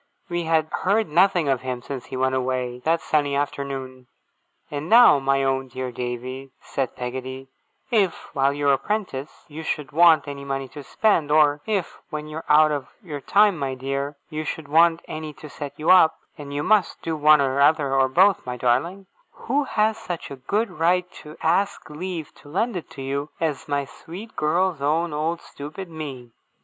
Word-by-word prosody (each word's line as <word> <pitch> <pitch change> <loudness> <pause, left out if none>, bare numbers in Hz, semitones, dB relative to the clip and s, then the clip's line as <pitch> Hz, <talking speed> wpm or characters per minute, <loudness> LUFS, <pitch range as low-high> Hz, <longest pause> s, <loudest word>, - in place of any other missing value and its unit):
We 175 -1 -2
had 160 -1 +2
heard 210 +4 +1
nothing 175 0 +3
of 135 -3 +1
him 125 -1 -4
since 135 -2 -6
he 130 - -5
went 130 0 +1
away, 125 -1 -1
that 165 +1 +2
sunny 145 -2 +1
afternoon. 135 -3 -4 0.6
'And 150 +2 -4
now, 235 -9 +8
my 135 0 +1
own 135 0 0
dear 130 0 -5
Davy,' 125 +2 -5
said 135 -3 -3
Peggotty, 130 +1 -6 0.4
'if, 200 -7 0
while 135 +1 +2
you're 140 0 +2
a 135 - +1
prentice, 185 -8 -4
you 155 0 -8
should 150 -2 -3
want 165 0 +5
any 140 -1 -6
money 135 -1 -3
to 145 - -9
spend; 165 0 +1
or 150 -1 +4
if, 200 -5 -2
when 150 -1 -5
you're 155 +1 -7
out 155 +1 +6
of 145 -3 -3 0.2
your 150 -6 -6
time, 205 +1 +3
my 135 -2 -2
dear, 140 +2 -3 0.2
you 155 0 -3
should 155 -1 -5
want 165 +2 +4
any 155 -1 -6
to 150 - -11
set 145 -1 -6
you 155 +3 +2
up 160 -4 +6 0.2
(and 145 -1 -9
you 145 +1 -2
must 210 -2 +2
do 165 -1 -2
one 155 0 +6
or 135 0 +1
other, 145 -2 +3
or 135 -1 +3
both, 190 +7 +4
my 125 0 -5
darling); 155 +12 0 0.3
who 290 0 -1
has 220 -2 +1
such 180 -10 -6
a - - -5
good 205 - -1
right 180 +2 +1
to 150 0 -12
ask 190 +1 0
leave 165 0 -5
to 145 - -17
lend 215 +8 -1
it 170 -5 -7
you, 140 +2 -3
as 155 -4 -2
my 145 -1 -1
sweet 185 +10 -11
girl's 170 +1 +1
own 155 +3 +1
old 160 +3 -1
stupid 155 +5 -9
me! 135 -7 -7
150 Hz, 185 wpm, -23 LUFS, 135-170 Hz, 0.6 s, now